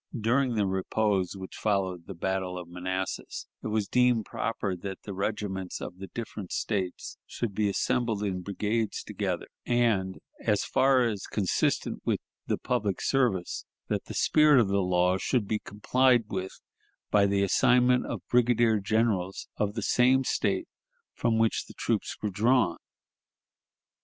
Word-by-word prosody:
During 125 +3 +2
the 105 -2 +2
repose 95 0 0
which 95 -1 -8
followed 95 -5 -1
the 95 - -7
battle 95 +1 -2
of 90 -1 -7
Manassas, 95 +1 -4 0.2
it - - -3
was 105 -2 0
deemed 125 -3 +3
proper 100 -4 -2
that 95 +1 -7
the 100 - -6
regiments 95 -1 -3
of 90 - -7
the 95 - -7
different 105 -5 -7
States 95 -5 -3
should 115 -4 -3
be 105 +1 +1
assembled 115 0 0
in 95 -3 -2
brigades 105 +3 -2
together, - - -3 0.2
and, 110 -6 +1 0.3
as - - +2
far 130 -1 +4
as 105 -4 -3
consistent 100 -4 0
with - - 0 0.3
the - - 0
public 100 -3 -1
service, 120 -10 0 0.2
that - - -1
the - - -8
spirit 150 -3 +5
of 110 -5 +3
the 100 0 +2
law 90 0 +2
should 120 -3 0
be 105 0 0
complied 125 +5 +2
with 95 -1 -5 0.5
by 100 -1 +5
the 100 0 +2
assignment 125 +5 +4
of - - -6
brigadier 120 -2 +3
generals 100 -3 0
of 105 0 -1
the - - -2
same 130 +2 +4
State - - 0 0.5
from 115 -2 +1
which 115 0 +1
the - - -13
troops - - -1
were 105 - 0
drawn. 110 -3 +2
105 Hz, 150 wpm, -28 LUFS, 95-115 Hz, 0.5 s, spirit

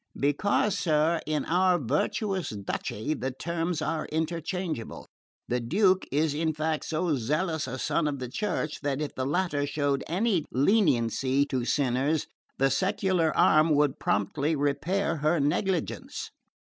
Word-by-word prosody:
"Because, 185 +8 +1
sir, 160 0 +2
in 155 -1 -1
our 180 +1 +3
virtuous 175 - -1
duchy 105 +5 -3
the 130 -3 -3
terms 165 +4 -2
are 155 0 -2
interchangeable. 165 -3 -3 0.4
The 125 - 0
Duke 185 - +2
is 150 +1 +1
in 160 +1 -1
fact 155 0 -1
so 160 0 0
zealous 155 +6 -1
a 130 - -4
son 150 +4 0
of 145 -1 -2
the 130 -1 -5
Church 160 - -3
that 140 -1 -1
if 150 -1 -3
the 130 0 -2
latter 150 -3 0
showed 145 -1 0
any 185 -1 +1
leniency 135 - +2
to 130 -4 -2
sinners 140 +3 +1 0.3
the 135 0 +2
secular 185 +1 +1
arm 155 0 +5
would 145 -2 +2
promptly 140 +10 0
repair 155 +5 0
her 155 +3 +1
negligence. 165 +5 -1
155 Hz, 140 wpm, -27 LUFS, 140-170 Hz, 0.4 s, arm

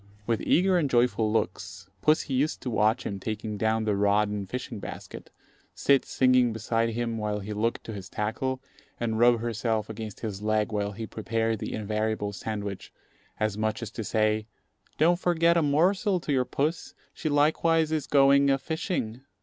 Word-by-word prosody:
With 115 -1 0
eager 185 0 +3
and 145 -4 0
joyful 120 -3 +2
looks, 95 -2 -3
pussy 155 -2 +2
used 140 +4 +1
to 125 - -3
watch 110 +1 +2
him 100 - -4
taking 110 +1 -4
down 110 +2 +1
the 105 -2 +1
rod 105 +1 +2
and 100 -2 -4
fishing 125 -2 -5
basket, - - -8 0.5
sit 140 -1 +3
singing 125 -2 +3
beside 115 +1 0
him 115 0 -2
while 105 -1 -1
he 105 +1 -5
looked 115 +3 -1
to 110 - -7
his 100 -1 -8
tackle, 130 +5 -2 0.4
and 110 -2 -1
rub 120 -1 +5
herself 115 -2 -1
against 110 -2 -7
his 105 -3 -4
leg 110 0 +1
while 105 -1 -1
he 110 +3 -5
prepared 115 0 -2
the - - -4
invariable 110 -1 -2
sandwich, 100 0 -5 0.5
as 110 -1 -1
much 110 +1 -1
as 110 - -6
to 115 - -5
say, 110 0 +1 0.5
"Don't 170 +3 +3
forget 170 -1 +3
a 170 - +4
morsel 180 +7 +2
to 150 - -3
your 130 -2 +2
puss; 155 +7 -2 0.2
she 155 - -3
likewise 160 +2 +2
is 155 -3 -1
going 140 0 +5
a 135 - +4
fishing." 135 -5 -3
115 Hz, 175 wpm, -27 LUFS, 105-135 Hz, 0.5 s, rub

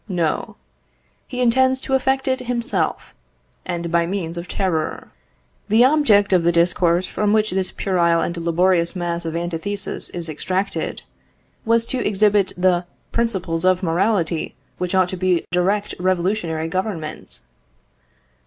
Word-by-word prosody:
No; 170 -5 -1 0.7
he 250 - -4
intends 260 +2 +3
to 270 - -4
effect 265 0 +1
it 260 0 +1
himself, 245 +2 -2 0.5
and 170 -2 -3
by 170 0 +2
means 175 -3 -3
of 170 +1 -6
terror. 175 -6 -2 0.6
The 225 +4 +6
object 225 -9 +4
of 180 - +5
the 170 - +3
discourse 170 +1 +2
from 210 +2 0
which 215 0 +2
this 190 0 0
puerile 170 -3 +1
and 170 +1 -2
laborious 170 +1 +1
mass 175 -1 -3
of 165 0 -3
antithesis 175 +4 -1
is 170 -1 -3
extracted, 185 +6 -3 0.6
was 230 0 +2
to 250 0 -2
exhibit 205 -1 +2
the 180 -1 +2 0.2
principles 190 -8 -1
of 185 0 +2
morality 175 -1 0 0.2
which 180 +1 -2
ought 185 -1 +3
to 185 -2 0
direct 195 +4 0
a - - -10
revolutionary 180 -3 0
Government. 175 - -4
185 Hz, 135 wpm, -21 LUFS, 170-210 Hz, 0.7 s, The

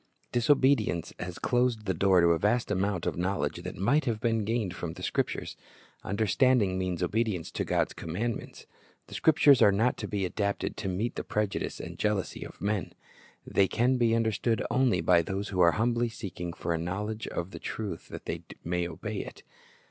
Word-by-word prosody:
Disobedience 120 - +2
has 90 -1 -5
closed 120 -3 +1
the 95 - +1
door 95 +1 +4
to 85 - +5
a 85 -1 +3
vast 110 +6 +1
amount 95 -2 0
of - - -1
knowledge 95 +2 -1
that - - -6
might 125 - +2
have 115 -4 -1
been 115 -2 0
gained 110 -5 -1
from 80 -2 -5
the - - -10
Scriptures. - - -2 0.5
Understanding 105 0 +2
means 90 -1 -2
obedience 100 -3 -1
to - - -2
God's - - 0
commandments. 105 +8 -4 0.4
The - - -13
Scriptures 150 -4 +5
are 100 - +7
not 110 +5 +2
to - - -4
be 100 -3 -1
adapted 100 +2 -2
to 100 - -4
meet 95 +6 -1
the - - -2
prejudice 105 -2 -2
and - - -8
jealousy 105 -3 -1
of - - -11
men. 105 -1 -2 0.5
They 95 - +3
can 125 +5 +2
be 115 -2 +3
understood 115 0 0
only 125 -9 +3
by 85 +1 +5
those 95 +4 -3
who 95 - -3
are 85 -1 +6
humbly 120 +1 +1
seeking 90 -6 -6
for 85 - -2
a 80 - -1
knowledge 105 +6 -3
of 85 +2 -4
the - - -8
truth 105 -3 -5
that - - -9
they - - -3 0.2
may 90 +1 -1
obey 95 +6 -5
it. - - -7
105 Hz, 185 wpm, -29 LUFS, 90-115 Hz, 0.5 s, are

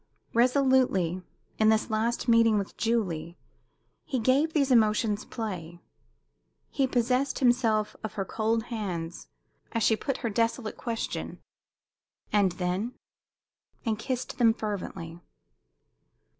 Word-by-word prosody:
Resolutely, 245 - +3 0.4
in 215 0 +5
this 220 +1 +2
last 230 +3 0
meeting 230 -2 +5
with 200 -1 -3
Julie, 180 -8 -1 0.7
he 280 -4 -2
gave 260 +7 +2
these 280 -4 +1
emotions 215 -2 +3
play. 175 -7 -5 0.9
He 275 -2 +1
possessed 255 +2 +1
himself 230 -4 +2
of 220 - -4
her 195 - -3
cold 225 +2 0
hands 175 -6 -4 0.5
as 230 -2 0
she 220 - +4
put 270 +4 -3
her - - +1
desolate 230 +1 0
question 230 -2 -4 1.0
"And 200 -4 +3
then?" 185 +7 -2 0.9
and 220 -2 0
kissed 255 +1 -4
them 225 -2 +5
fervently. 185 -6 -5
225 Hz, 115 wpm, -28 LUFS, 200-245 Hz, 1.0 s, in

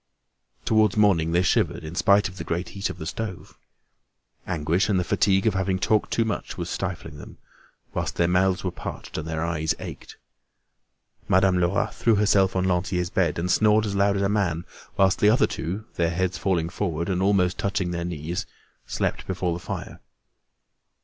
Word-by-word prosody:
Towards 110 -2 +3
morning, 90 -6 +3
they 90 +2 +3
shivered, 90 - +1
in 80 +1 -7
spite 100 +3 +4
of 95 0 -11
the - - -5
great 85 +1 -3
heat 100 0 -3
of - - -7
the 80 - -7
stove. 95 +2 -6 0.9
Anguish, 85 +5 0
and 95 -3 +2
the - - +1
fatigue 95 +2 +2
of 110 - +3
having 95 0 0
talked 105 +3 +1
too 115 - +1
much 110 - -4
was - - -4
stifling - - -5
them, - - -11 0.6
whilst - - -2
their 85 - +2
mouths 90 +1 +2
were 90 - -1
parched, - - -7
and 80 - -6
their 80 0 -2
eyes 80 -4 -1
ached. - - -9 1.1
Madame 95 -1 +3
Lerat 100 +5 +1
threw 115 -2 +2
herself 100 -2 +3
on 95 - +1
Lantier's 90 -1 0
bed, 85 -5 +1
and 90 +2 -1
snored 110 +2 +4
as 100 -2 -3
loud 100 0 +3
as 100 - 0
a - - +3
man; 95 -5 0 0.3
whilst 95 -1 +3
the 105 - +5
other 115 - +4
two, 95 +6 -4
their 85 -1 +2
heads 90 +2 -1
falling 85 -4 0
forward, 85 -2 -2
and 95 -1 0
almost 95 -2 +2
touching 95 -2 -1
their 85 -1 -3
knees, 85 0 -4 0.4
slept - - -2
before 90 -2 -1
the 85 0 -6
fire. - - -6
95 Hz, 185 wpm, -25 LUFS, 85-100 Hz, 1.1 s, the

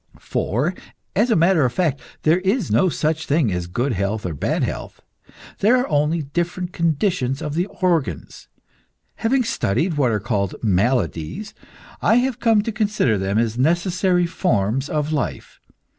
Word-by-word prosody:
For, 135 - -1 0.4
as 220 +6 +3
a 225 - +4
matter 170 -1 +4
of 125 -2 +1
fact, 155 -5 0 0.2
there 160 +3 +4
is 195 +2 0
no 185 - +4
such 160 0 -1
thing 145 -7 +2
as 90 -1 -3
good 120 +9 -1
health 100 +2 -2
or 90 - -2
bad 70 - -1
health. - - -5 0.6
There 230 +5 +4
are 250 - 0
only 150 +2 +1
different 175 +5 -3
conditions 160 -5 0
of 150 - -4
the 175 +4 0
organs. 170 - -2 0.7
Having 250 +3 +1
studied 160 - 0
what 135 -4 +3
are 105 - 0
called 100 -3 -1
maladies, 105 - 0 0.5
I - - +4
have 250 0 +1
come 225 -3 +3
to 225 - -2
consider 210 - +1
them 95 +2 -1
as 115 +1 0
necessary 175 - +2
forms 135 - 0
of 150 0 -1
life. 140 -5 -3
155 Hz, 160 wpm, -21 LUFS, 120-185 Hz, 0.7 s, a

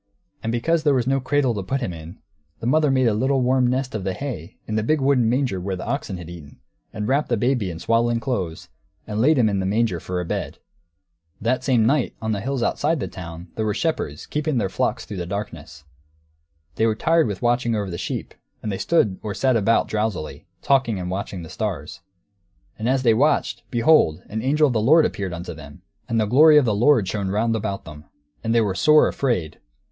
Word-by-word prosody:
And 115 - -2
because 160 +8 +1
there 145 -3 +3
was 125 -2 +1
no 135 +1 +1
cradle 135 -1 +1
to 100 - -3
put 135 +9 -2
Him 120 -9 -3
in, 80 +3 -10 0.4
the - - -6
mother 150 +4 +3
made 130 -1 +2
a 115 - +3
little 130 +5 +1
warm 125 0 +3
nest 130 +1 -1
of 110 -3 -3
the 95 0 -2
hay 125 - -6
in 110 - -5
the 110 - +1
big 155 +8 +1
wooden 135 -4 +3
manger 125 -6 0
where 95 +1 -3
the 90 - -6
oxen 125 -9 -3
had 90 -2 -9
eaten, 80 -6 -11 0.3
and 105 0 -4
wrapped 140 +3 +1
the 120 - +1
baby 120 -3 0
in 85 - -6
swaddling 115 +5 +1
clothes, 100 -10 -3 0.4
and 105 0 -2
laid 150 +5 +4
Him 120 -4 +4
in 100 -2 0
the 95 - -1
manger, 105 -3 +1
for 90 +2 -4
a 90 - -3
bed! - - -4 0.8
That 120 +3 0
same 120 -5 +3
night, 135 +1 +1
on 110 0 -2
the 100 -2 -2
hills 135 +1 -2
outside 155 +6 0
the - - -3
town, 85 -1 -9
there 110 - -2
were 105 -2 -1
shepherds, 80 - -2
keeping 150 -2 -2
their 100 -5 0
flocks - - -1
through 100 - -7
the 85 -1 -4
darkness. 95 -6 -6 0.9
They 110 - +3
were 110 - +1
tired 165 +6 +2
with 100 0 -5
watching 120 -1 +1
over 100 -3 -3
the 85 - -5
sheep, - - -4 0.3
and 105 - -2
they 95 - -4
stood 105 - +1
or 105 -2 -4
sat 130 -2 +2
about, 115 +1 +2
drowsily, 105 -7 -3 0.2
talking 130 -7 +2
and 90 0 -4
watching 95 -2 -4
the - - -9
stars. 95 -6 -4 0.8
And 110 +3 -1
as 130 0 +1
they 115 -3 +5
watched, 145 +7 +1
behold, 120 - +3
an 110 +1 -3
angel 150 +5 +3
of 135 - +1
the 110 - +1
Lord 155 +8 +5
appeared 95 -2 -3
unto 85 0 -6
them! 75 +3 -13 0.3
And 115 -1 +1
the 110 - +2
glory 150 +8 +6
of 145 - +5
the 110 - +1
Lord 115 -1 +3
shone 100 -1 -2
round 115 +3 +1
about 100 -3 -3
them! 75 -1 -11 0.4
And 115 0 0
they 115 - +5
were 100 -3 0
sore 150 +11 +5
afraid. 90 - -2
115 Hz, 225 wpm, -22 LUFS, 95-130 Hz, 0.9 s, glory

